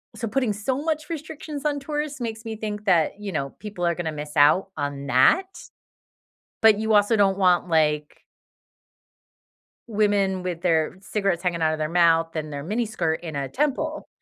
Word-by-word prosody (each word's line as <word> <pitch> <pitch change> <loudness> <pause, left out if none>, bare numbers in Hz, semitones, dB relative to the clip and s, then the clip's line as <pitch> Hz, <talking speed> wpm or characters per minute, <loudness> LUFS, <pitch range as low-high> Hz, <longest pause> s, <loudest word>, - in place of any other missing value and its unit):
so 230 - -4
putting 250 -1 0
so 255 +7 -2
much 310 -1 -2
restrictions 305 -2 -6
on 290 -1 0
tourists 295 0 -4
makes 225 -1 -4
me 220 -1 -4
think 210 -1 -5
that, 175 +1 +2
you 205 -2 -5
know, 140 -4 -3
people 205 -5 -4
are 170 - +2
gonna 165 -3 -3
miss 150 0 -7
out 155 +7 +4
on 145 -1 -3
that. 135 - +4 1.2
But 220 -2 +6
you 220 0 0
also 205 +2 +4
don't 195 -2 +3
want, 180 -2 +3
like 150 -2 +1 1.7
Women 200 -3 +1
with 175 -2 -4
their 165 0 +1
cigarettes 195 -3 -1
hanging 175 -2 -1
out 155 0 +3
of 155 - -3
their 155 - 0
mouth 165 -1 +3
and 155 -1 -4
their 140 -1 -5
miniskirt 205 -5 -1
in 160 -4 -5
a 140 -1 -2
temple 300 - -2
195 Hz, 175 wpm, -24 LUFS, 160-225 Hz, 1.7 s, But